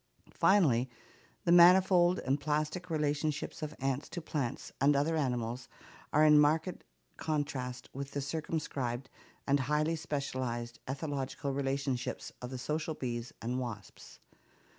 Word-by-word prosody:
Finally, 135 - +4 0.5
the 170 - +2
manifold 180 +1 +7
and 135 +2 0
plastic 155 +5 -1
relationships 150 0 -1
of 155 0 -4
ants 135 +1 -1
to 175 - -5
plants 145 -7 -3
and 145 +1 +5
other 150 +4 +2
animals 125 -4 -2 0.4
are 150 +1 +5
in 150 -1 +7
marked 155 +4 +2 0.3
contrast 140 -5 -3
with 140 +1 -5
the 140 - -3
circumscribed 135 -4 -3 0.3
and 140 0 +3
highly 150 +4 +1
specialized 130 -6 -3
ethological 140 0 -3
relationships 135 -2 -2
of 125 - -5
the 130 - -5
social 155 +4 -2
bees 120 -3 -4
and 125 +2 -1
wasps. 115 -5 -8
140 Hz, 125 wpm, -32 LUFS, 130-155 Hz, 0.5 s, manifold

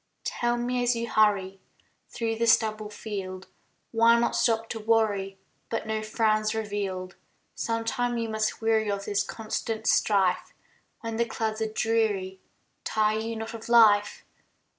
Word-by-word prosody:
Tell 240 0 -1
me 245 +1 -1
as 245 0 +2
you 230 0 -3
hurry 200 -3 +2 0.5
Through 225 -1 -2
the 230 +1 +1
stubble 215 -1 +2
field, 190 -3 -6 0.5
Why 230 0 +5
not 235 - +1
stop 225 -1 +1
to 225 - -4
worry 210 -3 +1 0.3
But 225 - -2
no 220 0 -2
frown's 215 0 +1
revealed. 200 -4 -4 0.4
Sometime 235 +2 -1
you 230 -1 -2
must 220 0 -2
weary 220 -1 +2
Of 200 0 -2
this 205 -1 0
constant 220 0 -4
strife; 190 -4 +2 0.5
When 230 -2 -4
the 235 - +2
clouds 220 -1 -3
are 220 -1 -1
dreary, 215 -4 0 0.4
Tire 215 0 +1
you 225 +1 -4
not 225 +1 -6
of 230 0 -8
life? 215 -3 +5
220 Hz, 145 wpm, -27 LUFS, 205-230 Hz, 0.5 s, Why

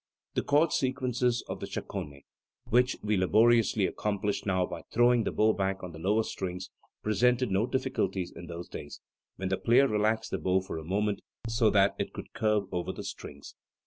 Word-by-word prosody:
The - - +1
chord 150 +3 +3
sequences 125 -2 0
of - - -5
the - - -5
Chaconne, 70 -1 -6 0.4
which 125 +2 +2
we 105 0 +1
laboriously 110 +2 +4
accomplish 105 +1 -2
now 95 -2 +2
by - - -7
throwing 120 0 +4
the - - 0
bow 110 +1 +3
back 95 -1 -2
on 90 - -6
the 80 - -10
lower 105 +6 +2
strings, 90 -3 -5 0.3
presented 120 +3 +2
no 100 +5 +2
difficulties 95 -10 -1
in 85 - -9
those 85 +1 -7
days, 75 - -8 0.4
when 95 0 -3
the 95 - +1
player 125 +4 +4
relaxed 110 0 0
the - - -1
bow 95 0 +2
for 95 -3 -5
a - - -8
moment 100 +4 -1 0.3
so 115 -1 +3
that 100 -1 +4
it - - -3
could - - -9
curve 105 -2 +1
over 90 -1 -2
the - - -7
strings. 70 0 -8
105 Hz, 185 wpm, -29 LUFS, 95-120 Hz, 0.4 s, laboriously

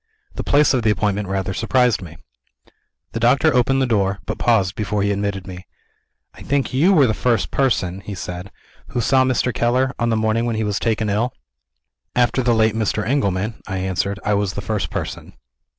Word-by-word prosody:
The - - -5
place 145 0 +3
of 130 - +1
the 110 - +2
appointment 105 -1 0
rather 95 0 -2
surprised 120 +1 +2
me. 85 -2 -10 0.9
The 115 - -4
doctor 135 +7 +3
opened 135 +2 +2
the - - +2
door 100 -5 +1
but - - -4
paused 100 -6 +2
before 105 -1 -2
he 100 - +1
admitted 100 -2 -2
me. 90 0 -9 0.7
"I - - -15
think 140 -2 -1
you 155 +9 +4
were 155 -8 +5
the 110 - +1
first 115 -2 0
person," 95 -9 0
he 100 +1 -7
said, 90 +2 -6 0.4
"who - - -3
saw 130 +3 +3
Mr. 130 -1 0
Keller, 130 +3 +1
on 120 - +1
the 115 - +2
morning 110 +1 +1
when 115 -2 -1
he 110 - -1
was 105 -2 -1
taken 110 -2 0
ill?" 110 +4 -1 0.8
"After 125 +1 +2
the 120 -2 +2
late 110 -1 +3
Mr. 110 -1 -1
Engelman," 110 -5 -1
I 95 0 -3
answered, 95 +2 -2
"I 105 - +2
was 100 -2 0
the 100 - -4
first 105 -1 -2
person. - - -5
110 Hz, 200 wpm, -20 LUFS, 100-125 Hz, 0.9 s, were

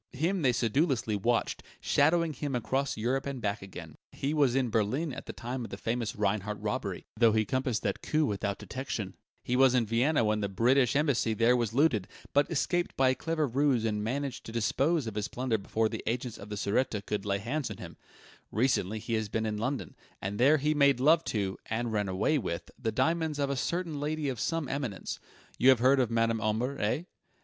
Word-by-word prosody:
Him 170 +8 0
they 130 -4 +4
sedulously 120 -1 +1
watched, 115 +4 0 0.2
shadowing 160 +2 +2
him 140 -1 -3
across 135 +3 -1
Europe 130 +5 -1
and 140 -2 -4
back 105 -2 -2
again. 95 -1 -9 0.2
He 140 +2 -2
was 140 -5 +3
in 130 -4 +1
Berlin 125 +8 0
at - - -8
the - - -4
time 125 +1 -5
of - - -7
the - - -6
famous 115 -1 -2
Rheinart 105 0 -1
robbery, - - -3
though 115 -1 +4
he 110 0 +2
compassed 130 -2 -1
that - - -1
coup 155 0 +1
without 100 -3 -2
detection; 110 -7 -5 0.3
he 125 - -1
was 130 -1 +5
in 120 -2 +3
Vienna 120 +6 +2
when 105 0 +1
the 100 -1 -1
British 125 +5 +3
embassy 125 -7 +2
there 115 +3 +4
was 115 -2 -1
looted, 130 - +3 0.3
but 145 +1 +3
escaped 175 +2 0
by 130 -1 +4
a - - +3
clever 160 +2 -1
ruse 135 -2 +1
and 105 -1 -1
managed 135 +4 -3
to - - -6
dispose 135 +7 +1
of 110 - -4
his 105 0 -2
plunder 125 -3 -1
before 110 +3 0
the - - -5
agents 120 0 -2
of 100 - -10
the 105 - -4
Sûreté 105 0 0
could 105 -2 -2
lay 100 -1 0
hands 125 +8 -3
on - - -7
him; - - -9 0.6
recently 110 -3 +1
he 115 +2 -4
has 110 -2 0
been 110 +1 -1
in 105 -1 -2
London, 130 +5 -3 0.2
and 100 +2 -4
there 140 +5 +6
he 150 +2 +1
made 140 -3 +4
love 155 +5 +5
to, 100 -3 -2
and 115 +1 -2
ran 105 -2 0
away 100 +11 +1
with, 85 -7 -4
the 115 -3 -1
diamonds 160 +4 0
of 140 -1 0
a - - 0
certain 170 +2 -2
lady 150 0 -1
of 125 -4 -4
some 165 +1 -1
eminence. 130 -9 -4 0.4
You 130 - +6
have 130 - +7
heard 130 +4 +4
of 125 -3 +2
Madame 115 -1 +1
Omber, 115 +6 -1
eh?" 110 +10 0
125 Hz, 210 wpm, -30 LUFS, 110-140 Hz, 0.6 s, have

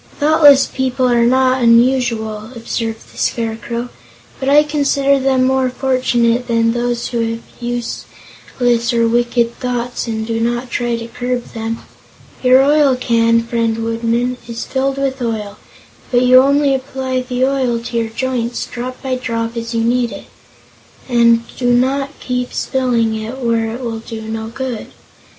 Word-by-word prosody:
"Thoughtless 295 -2 +6
people 260 -1 -1
are 235 -1 +3
not 260 +1 +3
unusual," 230 -3 +2
observed 225 -1 -5
the - - -11
Scarecrow, 235 +1 -2 0.5
"but 265 - -1
I 295 +1 +6
consider 280 -2 +1
them 265 -1 +2
more 260 0 +2
fortunate 250 -2 +1
than 230 -1 +2
those 240 0 -2
who 240 - -2
have 230 - -8 0.2
useless 240 0 -3
or 230 0 +3
wicked 235 0 0
thoughts 245 -1 -3
and 220 -1 -3
do 225 0 -2
not 240 +2 -2
try 240 -1 -1
to 230 0 -6
curb 245 +1 -4
them. 225 0 -4 0.6
Your 255 +1 +5
oil 290 -2 +4
can, 230 -2 +2
friend 230 -1 -1
Woodman, 230 +2 -1
is 235 -1 -5
filled 270 0 -1
with 270 -1 -2
oil, 215 -3 -3 0.5
but 245 0 +3
you 255 +1 +7
only 280 +1 +3
apply 260 -1 -2
the 250 0 0
oil 260 -3 0
to 235 +1 -5
your 225 -1 -1
joints, 245 0 -2
drop 255 +1 -6
by 265 -1 -2
drop, 230 -2 -3
as 230 0 -4
you 230 - +1
need 240 0 +1
it, - - -9 0.8
and 235 -2 +4
do 245 -1 +1
not 275 +3 0
keep 250 -1 -3
spilling 245 -4 0
it 220 +4 -5
where 230 -3 0
it 250 - -7
will 230 -2 -4
do 225 0 -8
no 220 0 -5
good. 245 0 -5
240 Hz, 155 wpm, -17 LUFS, 230-260 Hz, 0.8 s, you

